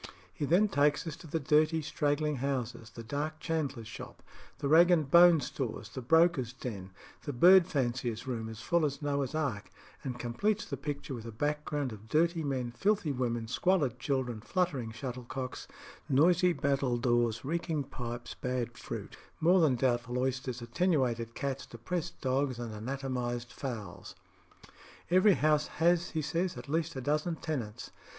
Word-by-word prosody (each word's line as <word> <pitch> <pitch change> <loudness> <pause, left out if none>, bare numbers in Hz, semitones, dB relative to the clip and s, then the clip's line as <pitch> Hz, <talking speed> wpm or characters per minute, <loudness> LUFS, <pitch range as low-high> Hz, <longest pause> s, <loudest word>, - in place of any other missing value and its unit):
He 145 - -2
then 180 +8 +4
takes 145 -3 +2
us 160 -3 -4
to 170 - -12
the 160 +2 -1
dirty 155 +2 +3
straggling 150 0 0
houses, 125 -4 -3
the 115 0 -9
dark 150 +6 -3
chandler's 140 -9 -2
shop, 115 - -10 0.3
the 140 - -2
rag 165 +4 +7
and 160 -5 +3
bone 170 -2 +8
stores, 110 -8 -4
the 130 - -6
broker's 160 -2 +3
den, 100 -8 -6 0.3
the 145 - -4
bird 180 +7 +7
fancier's 120 -7 -1
room 115 -4 -3
as 110 0 -8
full 170 -1 +2
as 145 0 -1
Noah's 140 -1 -1
ark, 135 -10 -2 0.3
and 125 -2 -4
completes 125 - -1
the - - -4
picture 145 -2 -5
with 115 -2 -7
a - - -6
background 145 +2 -2
of 110 +1 -12
dirty 165 +3 +2
men, 130 -4 -2
filthy 195 - +1
women, 120 -3 -2
squalid 140 -2 +1
children, 130 -5 -1
fluttering 140 - -1
shuttlecocks, 125 +1 -6 0.4
noisy 175 +6 +4
battledores, 120 -5 +1
reeking 160 -1 -1
pipes, 120 -2 -6
bad 125 -2 -3
fruit, - - -7 0.2
more 175 +4 +5
than 145 -6 +4
doubtful 120 -1 0
oysters, 130 -1 -2
attenuated 120 -5 0
cats, 135 -1 -3
depressed 135 +9 -4
dogs, 130 -1 0
and 120 -2 -5
anatomised 120 0 -3
fowls. 110 -9 -6 1.0
Every 185 +3 +6
house 150 0 +2
has, 170 +1 +3
he 160 -2 -2
says, 170 +5 -1
at - - -8
least 160 +2 -1
a 130 - -4
dozen 150 +5 0
tenants. 120 -9 -5
135 Hz, 155 wpm, -31 LUFS, 120-160 Hz, 1.0 s, bone